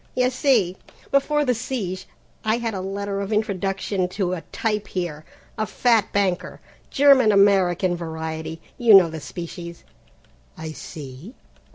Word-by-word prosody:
"You 255 0 +2
see, 235 -9 +2 0.3
before 295 +2 +2
the 250 - +2
siege, 210 -6 -4 0.4
I 220 +1 +2
had 230 -2 -3
a 190 - -3
letter 200 +1 -3
of 200 +2 -4
introduction 195 -2 -1
to 185 -1 -1
a 175 - -4
'type' 210 -2 -1
here, 165 -5 -4 0.3
a 215 - 0
fat 230 -2 +2
banker, 195 -3 -1 0.3
German 270 -5 +5
American 190 -3 +3
variety. 160 -1 -5 0.2
You 230 -4 +7
know 180 -4 +7
the 160 -1 -6
species, 170 +2 -8 0.7
I 160 0 -6
see. 150 - -9
195 Hz, 140 wpm, -23 LUFS, 175-225 Hz, 0.7 s, You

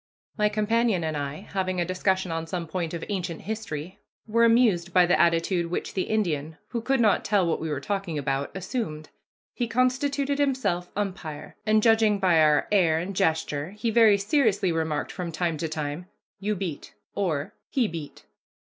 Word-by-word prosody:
My 210 -1 +2
companion 215 -2 +1
and 155 -1 -2
I, 145 0 -4
having 185 -2 -1
a 175 - +1
discussion 185 0 0
on 165 0 -3
some 175 0 -3
point 170 0 -3
of 165 - -5
ancient 180 -5 -3
history, 190 -5 -5 0.3
were 230 +1 +2
amused 225 -7 +3
by 180 -1 +6
the 175 - +3
attitude 170 +1 +2
which 175 - -3
the 185 - -1
Indian, 160 -8 -1
who 235 - -3
could 265 +3 +1
not 215 -3 +3
tell 200 -3 +2
what 165 - 0
we 160 - -3
were 145 -3 -2
talking 195 0 -3
about, 140 0 -1
assumed. 175 - -4 0.4
He 240 - -2
constituted 275 +4 +1
himself 210 -11 0
umpire, 185 -7 -5
and, 215 0 +4
judging 225 -2 +4
by 180 -4 +4
our 150 -1 +4
air 175 -6 +4
and 185 +4 -4
gesture, 160 +1 0
he 230 +1 -1
very 220 -2 +6
seriously 205 - +2
remarked 160 -2 -1
from 180 -2 -5
time 165 0 -1
to 160 +1 -3
time, 155 +2 -4 0.3
"You 210 +2 -1
beat," 175 -6 -6 0.2
or 160 -7 -1 0.2
"He 250 -5 +1
beat." 160 -5 -8
185 Hz, 175 wpm, -26 LUFS, 160-215 Hz, 0.4 s, by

